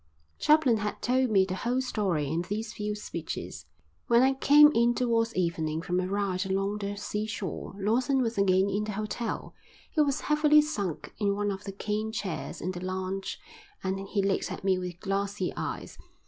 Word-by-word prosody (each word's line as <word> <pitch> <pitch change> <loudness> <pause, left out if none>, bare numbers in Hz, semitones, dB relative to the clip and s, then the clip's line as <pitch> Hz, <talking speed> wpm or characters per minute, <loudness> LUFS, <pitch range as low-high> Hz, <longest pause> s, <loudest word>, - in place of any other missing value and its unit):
Chaplin 300 -7 +4
had 210 0 -3
told 255 +1 +2
me 195 -3 +4
the 190 - -4
whole 240 +7 0
story 195 - 0
in 160 +4 0
these 215 +4 -4
few 210 0 -3
speeches. 170 -6 -6 0.4
When 235 +1 +5
I 265 +1 +4
came 295 +2 +7
in 235 +1 +3
towards 230 -2 +1
evening 165 -3 -1
from 180 0 0
a 185 - -1
ride 195 -1 -1
along 195 +2 -1
the 200 0 -3
seashore 210 -2 -4
Lawson 250 +6 +2
was 230 0 -1
again 190 -1 +3
in 205 +1 -1
the 210 - -4
hotel. 215 +3 -4 0.4
He 310 - +2
was 280 -2 +1
heavily 300 0 +5
sunk 200 - -4
in 200 -2 +1
one 205 0 0
of 195 0 -6
the 200 - -4
cane 210 +2 -2
chairs 195 -7 -4
in 180 - -2
the 180 -1 -7
lounge 185 +1 -3 0.4
and 190 0 -1
he 200 0 0
looked 195 0 0
at - - -6
me 190 -1 +2
with 180 -1 -6
glassy 195 -1 -1
eyes. - - -5
205 Hz, 185 wpm, -28 LUFS, 190-230 Hz, 0.4 s, came